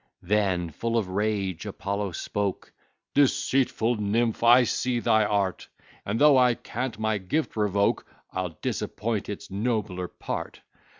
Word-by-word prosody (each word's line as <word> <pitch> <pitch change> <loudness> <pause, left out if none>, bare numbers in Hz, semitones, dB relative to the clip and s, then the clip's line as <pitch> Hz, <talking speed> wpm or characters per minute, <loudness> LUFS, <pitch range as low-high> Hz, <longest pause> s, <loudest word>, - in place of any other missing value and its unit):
Then, 95 -3 +1
full 115 +9 -1
of 105 -5 -1
rage, 100 -2 -1
Apollo 100 -1 -3
spoke: 100 +1 -3 0.4
"Deceitful 130 -4 +2
nymph! 110 +2 0
I 120 +2 +7
see 120 +1 0
thy 110 -1 +3
art; 100 -3 -1 0.4
And, 105 +3 -1
though 145 -3 +7
I 125 -2 +4
can't 125 +1 -4
my 110 -1 0
gift 125 +13 -2
revoke, 100 -2 +1 0.3
I'll 90 -3 -4
disappoint 110 -2 -2
its 105 - -7
nobler 100 -4 -1
part. - - -6
105 Hz, 130 wpm, -26 LUFS, 100-115 Hz, 0.4 s, I